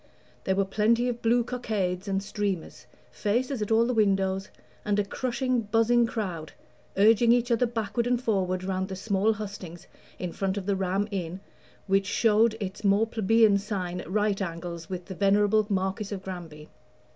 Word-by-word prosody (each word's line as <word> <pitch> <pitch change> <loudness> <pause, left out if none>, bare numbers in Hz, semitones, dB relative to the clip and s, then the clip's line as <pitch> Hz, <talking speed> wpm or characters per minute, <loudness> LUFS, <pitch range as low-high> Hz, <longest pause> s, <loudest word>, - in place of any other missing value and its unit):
There 190 - +1
were 195 0 +2
plenty 220 +5 +2
of 240 -1 -4
blue 235 +1 +3
cockades 210 -6 -2
and 195 0 -1
streamers, 200 -4 -4 0.2
faces 245 +4 -1
at 210 - -2
all 225 +1 +4
the 250 - 0
windows, 195 -3 +1 0.3
and 205 -1 0
a 205 - +1
crushing 255 +2 -1
buzzing 230 +2 +3
crowd, 180 -9 -4 0.4
urging 225 +3 +5
each 245 0 +2
other 235 +1 +3
backward 230 0 -2
and 245 -1 +2
forward 185 -6 0
round 190 0 -2
the 190 - -5
small 200 +2 +1
hustings 195 -5 -8 0.3
in 180 -2 -4
front 195 +2 -2
of 195 - -4
the 200 0 +1
Ram 190 +2 0
Inn, 180 -2 -4 0.5
which 195 0 +1
showed 220 +1 +3
its 195 0 -5
more 200 +2 +4
plebeian 220 -2 +3
sign 185 -3 -4
at - - -11
right 205 0 0
angles 170 -2 -5
with 180 -2 -5
the 190 - -7
venerable 205 +2 +3
Marquis 195 +1 -1
of 190 - -9
Granby. 165 -5 -8
200 Hz, 170 wpm, -27 LUFS, 190-225 Hz, 0.5 s, urging